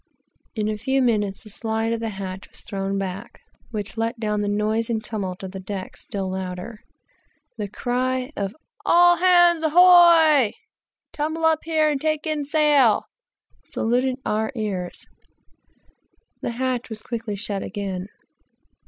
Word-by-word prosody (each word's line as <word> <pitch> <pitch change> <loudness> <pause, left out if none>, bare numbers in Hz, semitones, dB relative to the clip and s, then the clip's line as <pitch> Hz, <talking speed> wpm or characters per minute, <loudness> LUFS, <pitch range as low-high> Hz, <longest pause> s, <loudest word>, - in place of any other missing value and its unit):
In 215 -2 -1
a 215 0 -2
few 265 +5 +1
minutes 210 -6 0
the 215 - -11
slide 225 +1 -2
of 230 - -2
the 225 0 -3
hatch 190 -1 -7
was - - -12
thrown 195 0 -3
back, 195 0 -5 0.3
which 215 -1 -5
let 230 +1 -2
down 210 -2 -1
the 205 - -1
noise 215 +2 0
and 220 -2 -1
tumult 195 -4 -4
of 190 - -6
the 190 - -7
deck 190 0 -6
still 195 -2 -5
louder, 190 +4 -5 0.8
the 210 - -1
loud 200 - -10
cry 255 +2 -1
of 200 +2 -3 0.3
"All 350 0 +6
hands, 350 -2 +5
ahoy! 325 - +6 0.6
tumble 315 +2 -2
up 320 -1 +4
here 315 -2 +2
and 290 -3 0
take 310 -1 -1
in 310 -2 -1
sail," 290 -6 +4 0.7
saluted 250 +3 0
our 220 +3 0
ears, 195 -6 -4
and - - -39 0.5
the - - -2
hatch 255 -1 -1
was 220 -1 -7
quickly 225 -3 -4
shut 200 -1 -3
again. 195 -2 -4
225 Hz, 155 wpm, -23 LUFS, 200-290 Hz, 0.8 s, All